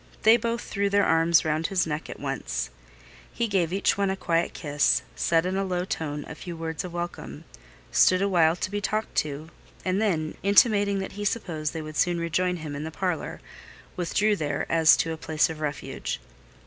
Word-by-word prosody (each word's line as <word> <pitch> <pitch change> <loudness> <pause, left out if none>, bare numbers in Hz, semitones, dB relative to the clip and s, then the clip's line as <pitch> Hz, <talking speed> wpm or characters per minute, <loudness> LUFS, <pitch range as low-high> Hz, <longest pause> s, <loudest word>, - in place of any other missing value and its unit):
They 220 +1 +8
both 235 -1 -1
threw 200 0 -1
their 200 0 +3
arms 165 +1 +4
round 155 +1 0
his 190 -3 +1
neck 155 0 -4
at - - -8
once. - - -3 0.6
He 235 - -1
gave 185 -5 +1
each 195 +1 +1
one 195 -1 +1
quiet 170 -2 0
kiss, 145 -3 +1
said 165 0 +2
in 185 +1 -1
a 195 - 0
low 180 -2 -1
tone 150 -5 -4
a - - -7
few 170 +2 -8
words 160 -1 -4
of 180 - -6
welcome, 175 0 -6 0.5
stood 185 - +5
a 200 - +2
while 170 -4 +4
to 185 - -3
be 205 0 -2
talked 215 +2 -2
to, 150 +1 -1 0.4
and 185 +2 +1
then, 160 -7 0
intimating 200 0 +4
that 190 0 -4
he 205 +1 -6
supposed 160 -8 -2
they 160 -1 -4
would 155 0 -7
soon 175 -1 +2
rejoin 180 +2 0
him 155 -4 -6
in 145 - -4
the 160 - -4
parlour, 175 0 -3 0.5
withdrew 205 +4 +1
there 150 -6 -2
as 160 -1 +6
to 165 - 0
a - - -6
place 155 0 +1
of 155 - -8
refuge. 150 - -4
175 Hz, 200 wpm, -26 LUFS, 155-195 Hz, 0.6 s, They